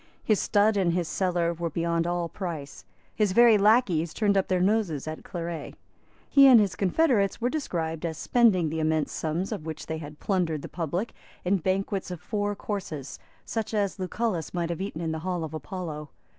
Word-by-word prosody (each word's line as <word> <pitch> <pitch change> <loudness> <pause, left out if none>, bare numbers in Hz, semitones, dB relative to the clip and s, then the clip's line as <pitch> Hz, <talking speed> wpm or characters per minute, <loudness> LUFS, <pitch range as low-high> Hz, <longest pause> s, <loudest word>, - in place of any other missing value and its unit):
His 215 -3 +2
stud 210 0 +3
and 180 -3 +2
his 175 -2 0
cellar 175 -2 0
were 170 0 -3
beyond 170 +1 0
all 175 -1 -1
price. 165 -6 -6 0.3
His 210 -4 +1
very 235 +1 +7
lacqueys 195 -7 +3
turned 205 -2 +2
up 195 - +2
their 185 -1 +1
noses 185 -7 +1
at 155 0 -6
claret. 170 -2 -5 0.5
He 275 -1 +7
and 250 -3 +9
his 205 -3 +1
confederates 200 - +2
were 245 +2 0
described 165 - -3
as 160 -2 -3
spending 195 -7 +3
the 160 +1 -3
immense 155 -1 +1
sums 165 +6 -2
of 200 -7 -4
which 160 - -6
they 160 0 -4
had 150 -1 -9
plundered 170 -7 0
the - - -5
public 175 +6 -3 0.3
in 195 +2 +3
banquets 190 +2 -1
of 180 -2 -5
four 205 +2 -2
courses, 185 -10 -5 0.3
such 225 -1 -3
as 200 -2 0
Lucullus 185 -3 -2
might 170 -1 -1
have 170 - -4
eaten 190 -4 -4
in 165 -1 -1
the 160 - -3
Hall 180 0 -2
of 160 -1 -6
Apollo. 155 -1 -6
180 Hz, 190 wpm, -27 LUFS, 160-205 Hz, 0.5 s, and